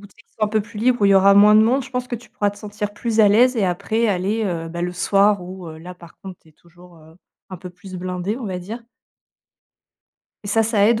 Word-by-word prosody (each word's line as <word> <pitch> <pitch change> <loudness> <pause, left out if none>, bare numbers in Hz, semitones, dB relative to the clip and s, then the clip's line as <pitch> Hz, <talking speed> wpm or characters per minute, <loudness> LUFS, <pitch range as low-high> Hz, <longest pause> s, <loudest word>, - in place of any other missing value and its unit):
dès 200 - -13 0.2
qu'ils - - -42
sont 215 - +2
un - - -2
peu 215 0 0
plus 210 - -11
libre 245 +1 +1
où - - +5
il 200 - +4
y - - +5
aura 195 +1 +5
moins 210 +1 +6
de 215 - +7
monde, 245 +4 +2
je 255 - -13
pense 250 -1 -4
que - - -4
tu 235 -1 -17
pourras 210 -4 -1
te 205 - -15
sentir 205 0 -6
plus 225 -1 0
à 210 - +6
l'aise 245 +5 +4
et 215 -5 0
après 215 +6 -1
aller, 200 +4 -1
heu, 165 -3 -3
bah, 170 +1 -7
le 180 - -2
soir 200 +2 +2
où 180 -1 -9
là 170 +3 -11
par 170 -1 -16
contre, 190 -2 -10
c'est 160 - -23
toujours, 175 +2 -20
heu, 160 +1 -19 0.3
un 185 - -7
peu 180 - -9
plus 185 +1 -13
blindé, 185 +4 -4
on 240 - -6
va 185 -2 -4
dire. 220 +7 -8 1.6
Et - - -7
ça, 225 +2 +2
ça 215 -2 +2
aide 225 -1 +2
200 Hz, 265 wpm, -20 LUFS, 180-220 Hz, 1.6 s, de